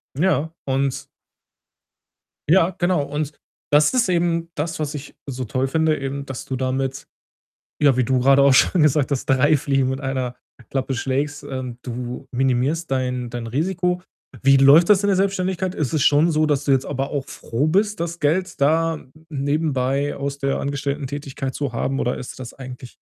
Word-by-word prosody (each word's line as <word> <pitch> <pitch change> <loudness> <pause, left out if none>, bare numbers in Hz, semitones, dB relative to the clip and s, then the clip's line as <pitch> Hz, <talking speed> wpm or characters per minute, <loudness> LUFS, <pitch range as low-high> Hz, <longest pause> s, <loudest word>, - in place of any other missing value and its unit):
Ja, 160 0 +1
und 135 0 -1 1.5
Ja, 175 +1 +5
genau. 175 -4 +2
Und 145 +1 -3 0.4
das 150 - +5
ist 250 -5 +2
eben 170 -1 +1
das, 160 +2 -3
was 150 0 -3
ich 145 0 -8
so 130 -1 -4
toll 130 +4 -1
finde 160 +2 +1
eben, 140 +1 -4
dass 130 -3 -7
du 130 - -3
damit, 130 +1 -2 0.8
ja, 140 -4 +4
wie 130 - +3
du 130 +2 +1
grade 135 +2 +5
auch 140 -1 +6
schon 165 +5 +4
gesagt 150 -1 +3
hast, 135 - -2
3 135 +3 +4
Fliegen 135 -1 +1
mit 130 - -3
einer 130 -3 -2 0.3
Klappe 135 0 -2
schlägst. 140 +3 -2
Ähm, 130 -2 -5
du 125 +2 -6
minimierst 135 +5 0
dein 125 -2 -1
dein 120 -1 -5
Risiko. 180 +7 -1 0.4
Wie 135 0 +6
läuft 140 +5 +7
das 205 -1 +5
in 205 - +2
der 195 - +3
Selbstständigkeit? 185 -1 0
Ist 145 -5 -2
es 155 -3 +1
schon 150 +5 +4
so, 155 0 +2
dass 145 -2 0
du 140 - +2
jetzt 135 0 +2
aber 135 0 -3
auch 140 -2 -3
froh 120 +6 -2
bist, 205 +5 +1
das 170 0 -3
Geld 170 +2 0
da 160 +3 +2 0.3
nebenbei 140 -1 0
aus 140 0 -4
der 135 -1 -1
Angestelltentätigkeit 140 -1 -4
zu 140 -5 -3
haben 135 +4 -1
oder 125 - 0
ist 125 - -8
das 120 -2 -8
eigentlich 125 -2 -9
140 Hz, 175 wpm, -22 LUFS, 130-160 Hz, 1.5 s, läuft